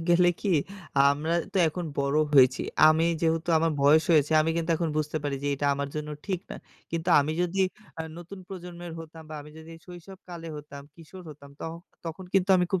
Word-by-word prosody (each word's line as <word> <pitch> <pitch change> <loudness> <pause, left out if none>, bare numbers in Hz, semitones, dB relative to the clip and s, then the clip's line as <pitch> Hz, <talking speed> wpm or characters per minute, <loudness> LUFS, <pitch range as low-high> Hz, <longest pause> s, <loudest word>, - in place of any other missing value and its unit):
গেলে 175 +1 +5
কি 205 - -2 0.6
আমরা 150 +3 -1 0.2
তো - - +2
এখন 175 +3 -5
বড় 140 +1 +1 0.2
হয়েছি। 130 -2 +5 0.3
আমি 160 +1 +4 0.2
যেহেতু 165 0 0
আমার 165 0 +1
বয়স 155 +3 +6
হয়েছে 150 -1 +3
আমি 155 +1 +1
কিন্তু 170 0 -1
এখন 165 0 -1
বুঝতে 155 0 -1
পারি 145 -1 -2
যে - - 0
এটা 145 +1 -2
আমার 140 0 -3
জন্য 150 0 -4 0.2
ঠিক 190 -4 -1
না। - - -5 0.3
কিন্তু 165 +1 -3
আমি 145 +2 -1
যদি 180 +2 -1 0.4
আ - - -2 0.2
নতুন 175 +3 -10
প্রজন্মের 175 -2 -8
হতাম 165 0 -10
বা - - -6
আমি 150 +1 -12
যদি 160 +1 -11
শৈশবকালে 175 -1 -10
হতাম, 145 -1 -10
কিশোর 170 +3 -12
হতাম, 140 -1 -13
তখ 160 - -4 0.3
তখন 165 +3 -6
কিন্তু 195 0 +3
আমি 180 - +3
খুব 190 - +2
160 Hz, 195 wpm, -27 LUFS, 150-175 Hz, 0.6 s, বয়স